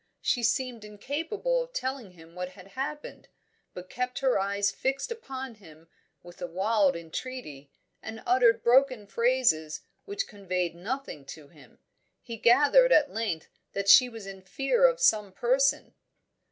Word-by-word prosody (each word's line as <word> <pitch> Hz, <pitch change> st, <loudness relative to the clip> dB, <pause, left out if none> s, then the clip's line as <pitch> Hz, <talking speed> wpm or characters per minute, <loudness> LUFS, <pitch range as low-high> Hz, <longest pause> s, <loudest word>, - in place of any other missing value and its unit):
She 245 Hz, -, 0 dB
seemed 235 Hz, 0 st, -1 dB
incapable 325 Hz, -, -2 dB
of -, -, -8 dB
telling 260 Hz, -, -4 dB
him 165 Hz, -1 st, -17 dB
what 180 Hz, +1 st, -6 dB
had 185 Hz, +1 st, -15 dB
happened, 290 Hz, +6 st, -6 dB, 0.5 s
but 180 Hz, 0 st, -8 dB
kept 250 Hz, +3 st, -4 dB
her 260 Hz, -6 st, +2 dB
eyes 200 Hz, +1 st, 0 dB
fixed 275 Hz, -, -2 dB
upon 265 Hz, -, -6 dB
him 165 Hz, -6 st, -18 dB, 0.3 s
in 175 Hz, 0 st, -12 dB
a 175 Hz, -, -3 dB
wild 190 Hz, +1 st, +1 dB
entreaty, 165 Hz, -, -7 dB, 0.3 s
and 220 Hz, 0 st, -8 dB
uttered 240 Hz, -2 st, +3 dB
broken 255 Hz, -2 st, +3 dB
phrases 230 Hz, -9 st, +1 dB, 0.2 s
which 405 Hz, 0 st, -3 dB
conveyed 185 Hz, -5 st, -3 dB
nothing 195 Hz, -, -6 dB
to 145 Hz, 0 st, -11 dB
him; 155 Hz, -4 st, -19 dB, 0.4 s
he 235 Hz, -, -8 dB
gathered 290 Hz, -, +5 dB
at 295 Hz, -, +4 dB
length 210 Hz, -7 st, -3 dB, 0.2 s
that 200 Hz, 0 st, -3 dB
she 250 Hz, +5 st, +8 dB
was 225 Hz, -4 st, -10 dB
in 195 Hz, -1 st, -9 dB
fear 275 Hz, -, +2 dB
of -, -, -1 dB
some 210 Hz, -, +3 dB
person. 260 Hz, +7 st, +1 dB
230 Hz, 150 wpm, -28 LUFS, 185-265 Hz, 0.5 s, she